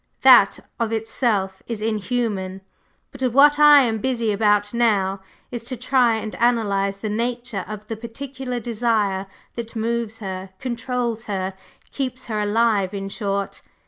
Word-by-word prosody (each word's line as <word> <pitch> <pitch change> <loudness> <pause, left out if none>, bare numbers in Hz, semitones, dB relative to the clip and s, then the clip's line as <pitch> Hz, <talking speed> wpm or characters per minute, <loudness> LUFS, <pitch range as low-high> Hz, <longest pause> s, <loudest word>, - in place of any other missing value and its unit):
That 250 -7 +7 0.2
of 230 -1 0
itself 215 -4 -1
is 230 -3 -4
inhuman; 210 -3 -2 0.5
but 270 - -12
what 290 +4 +6
I 295 -2 +8
am 225 -3 0
busy 235 -3 0
about 205 0 +2
now 200 -5 +1 0.3
is 240 -2 -5
to 255 +1 -4
try 250 -1 +3
and 220 -1 -4
analyze 200 -5 +1
the 215 - -5
nature 235 -1 -2
of 210 0 -7
the 225 - -5
particular 250 +2 -6
desire 215 -4 0 0.3
that 235 -1 -7
moves 230 0 -2
her, 190 -2 -6
controls 235 -2 -3
her, 190 -2 -3 0.4
keeps 255 -2 -4
her 215 -2 -2
alive, 210 -2 +1
in 195 0 -4
short. 200 -1 -3
225 Hz, 145 wpm, -22 LUFS, 200-240 Hz, 0.5 s, I